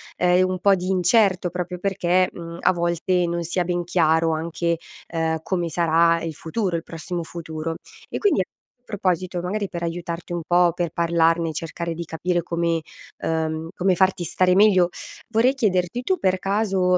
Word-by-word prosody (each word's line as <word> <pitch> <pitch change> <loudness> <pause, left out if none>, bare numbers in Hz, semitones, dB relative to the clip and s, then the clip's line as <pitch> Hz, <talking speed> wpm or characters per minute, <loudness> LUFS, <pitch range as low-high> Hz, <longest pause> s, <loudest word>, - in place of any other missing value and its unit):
ehm, 180 +1 +3
un 185 -1 -3
po' 200 0 +5
di 180 -1 -5
incerto 185 -1 +3
proprio 180 0 -4
perché, 185 -1 +1
mhmm, 170 0 -8
a - - +4
volte 175 +1 0
non 170 0 -2
si 170 +2 -4
ha 180 - +3
ben 175 0 -1
chiaro 165 -2 +2
anche 170 +1 -1 0.6
come, 175 +1 -1
ehm, 170 - -2
sarà 165 0 +3
il 165 -1 -4
futuro 180 +3 -2
il 165 - -2
prossimo 170 +1 -5
futuro. 160 -1 -5 0.4
E - - -3
quindi 400 - +3
a - - +1 0.4
proposito, 185 -3 -1
magari 200 +3 -2
per 175 -2 -6
aiutarti 170 +1 -4
un 175 - -2
po' 175 0 +4
per 175 -2 -2
parlarne 165 0 +2
e - - -5
cercare 165 +1 -4
di 170 0 -5
capire 175 +2 -1
come, 170 -1 0 0.4
ehm, 160 0 -1
come 185 0 +2
farti 190 -1 +2
stare 180 +2 +2
meglio, 185 -3 +5 0.4
vorrei 240 +4 +3
chiederti: 200 -1 0
tu 370 +7 0
per 185 0 +2
caso 195 -2 +1
175 Hz, 175 wpm, -23 LUFS, 170-185 Hz, 0.6 s, po